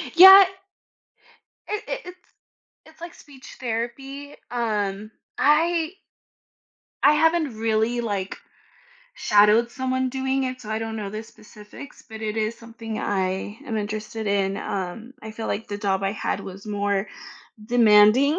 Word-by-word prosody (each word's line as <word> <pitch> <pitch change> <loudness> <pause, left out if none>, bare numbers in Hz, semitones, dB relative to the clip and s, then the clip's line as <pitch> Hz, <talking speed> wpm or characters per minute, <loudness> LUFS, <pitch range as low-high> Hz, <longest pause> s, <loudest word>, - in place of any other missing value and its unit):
Yeah 385 +3 +11 1.3
I - - -3
it - - -4
it's 360 0 -14 0.5
it's 315 +1 -20
like 340 0 -8
speech 275 -3 -15
therapy, 270 +4 -5
um, 215 -3 -2 0.3
I 325 +2 +2 1.1
I 290 - +7
haven't 320 -5 +2
really, 225 +2 0
like, 200 -4 -3 0.8
shadowed 210 +3 +4
someone 260 +1 -1
doing 265 +1 -1
it, 255 0 -4
so 215 -3 -9
I 220 - -1
don't 225 0 -5
know 205 -2 -5
the 215 +2 -5
specifics, 215 +4 -14
but 220 -1 -9
it 215 0 -3
is 220 +1 -1
something 225 -1 -8
I 190 +2 -2
am 225 - -3
interested 215 +1 -4
in. 195 -1 0
Um, 200 +7 -5
I 220 - -7
feel 220 +1 -6
like 220 - -3
the 205 - -4
job 195 -2 -1
I 195 +1 0
had - - -3
was 195 +2 -10
more 205 -1 -1 0.6
demanding, 235 +5 +5
225 Hz, 140 wpm, -23 LUFS, 210-265 Hz, 1.3 s, Yeah